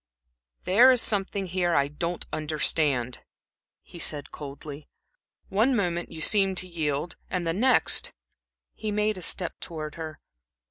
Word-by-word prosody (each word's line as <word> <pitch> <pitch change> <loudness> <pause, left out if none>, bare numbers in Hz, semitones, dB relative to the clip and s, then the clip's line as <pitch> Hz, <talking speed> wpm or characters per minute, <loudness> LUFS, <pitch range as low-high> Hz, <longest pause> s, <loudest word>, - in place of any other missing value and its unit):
"There 230 +8 +7
is 255 -1 +5
something 200 -2 +1
here 175 -1 0
I 140 0 +3
don't 170 +4 -3
understand," 150 -5 +1 0.6
he 170 - -12
said, 150 -3 -2
coldly. 145 +1 -9 0.6
"One 225 +7 +3
moment 175 -5 -1
you 160 - -7
seemed 195 +1 +3
to 185 - -1
yield, 160 -1 -2
and 180 -2 -2
the 165 - +1
next" 245 +7 +3 0.6
He 215 -1 -4
made 210 -1 +1
a - - -9
step 180 0 -2
towards 155 -2 -6
her. 155 -2 -6
175 Hz, 140 wpm, -27 LUFS, 155-195 Hz, 0.6 s, There